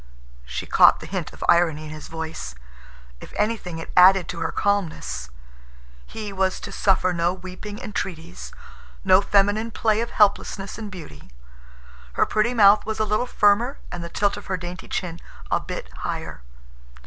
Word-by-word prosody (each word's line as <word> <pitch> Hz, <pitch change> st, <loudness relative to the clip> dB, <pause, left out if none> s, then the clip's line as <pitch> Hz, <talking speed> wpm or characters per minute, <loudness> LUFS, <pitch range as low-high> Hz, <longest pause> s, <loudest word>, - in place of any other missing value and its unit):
She -, -, -4 dB
caught -, -, +6 dB
the -, -, -9 dB
hint -, -, -4 dB
of -, -, -9 dB
irony 170 Hz, -3 st, +3 dB
in 150 Hz, -, -8 dB
his 155 Hz, -1 st, -8 dB
voice. 160 Hz, -, -6 dB, 0.6 s
If -, -, -12 dB
anything, 210 Hz, -6 st, -1 dB
it 165 Hz, -, -7 dB
added 185 Hz, 0 st, +7 dB
to 170 Hz, -, -5 dB
her 165 Hz, -, -1 dB
calmness. 185 Hz, -, -1 dB, 0.8 s
He 210 Hz, -2 st, -6 dB
was 190 Hz, -1 st, 0 dB
to -, -, -7 dB
suffer 185 Hz, -2 st, +2 dB
no 170 Hz, +1 st, +1 dB
weeping 185 Hz, +3 st, -8 dB
entreaties, 180 Hz, -7 st, -6 dB, 0.5 s
no 190 Hz, 0 st, +6 dB
feminine 205 Hz, +3 st, +2 dB
play 220 Hz, -1 st, +1 dB
of 235 Hz, -, -3 dB
helplessness 200 Hz, -1 st, +1 dB
and 215 Hz, -2 st, -6 dB
beauty. 155 Hz, -, -11 dB, 0.8 s
Her -, -, +3 dB
pretty 225 Hz, +3 st, +1 dB
mouth 205 Hz, -1 st, +6 dB
was 220 Hz, 0 st, -4 dB
a 215 Hz, -, +2 dB
little 215 Hz, +4 st, 0 dB
firmer 230 Hz, +7 st, +3 dB
and 175 Hz, -1 st, -5 dB
the 170 Hz, -, -6 dB
tilt 205 Hz, +3 st, 0 dB
of 205 Hz, -, -10 dB
her 190 Hz, -, -1 dB
dainty 175 Hz, +1 st, -7 dB
chin 170 Hz, -2 st, -4 dB, 0.3 s
a -, -, +3 dB
bit -, -, -6 dB
higher. -, -, -5 dB
190 Hz, 165 wpm, -23 LUFS, 170-210 Hz, 0.8 s, added